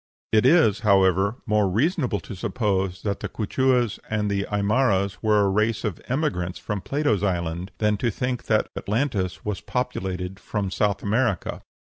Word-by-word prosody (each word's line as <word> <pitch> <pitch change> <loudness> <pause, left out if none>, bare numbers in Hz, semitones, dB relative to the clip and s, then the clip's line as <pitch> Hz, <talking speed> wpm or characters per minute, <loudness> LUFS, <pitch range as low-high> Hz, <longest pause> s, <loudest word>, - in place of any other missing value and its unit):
It 110 +3 +4
is, 115 - +5
however, 95 0 +3
more 105 -4 +2
reasonable 125 - +1
to - - -8
suppose 95 -2 -1
that 100 -1 -1
the - - -4
Quichuas 125 +1 +1
and 105 -1 0
Aimaras 100 0 +1
were 105 -2 +3
a 100 - +3
race 105 +3 +1
of 105 -7 -3
emigrants 130 - -1
from 105 -2 -4
Plato's 140 -7 0
island 90 -1 -2
than 105 -1 +1
to 120 - 0
think 125 +3 -3
that 110 -1 +2
Atlantis 105 -5 -2
was 105 -2 -3
populated 95 -7 -3
from 100 -3 -3
South 100 0 0
America. 110 -2 0
105 Hz, 150 wpm, -24 LUFS, 95-120 Hz, -, is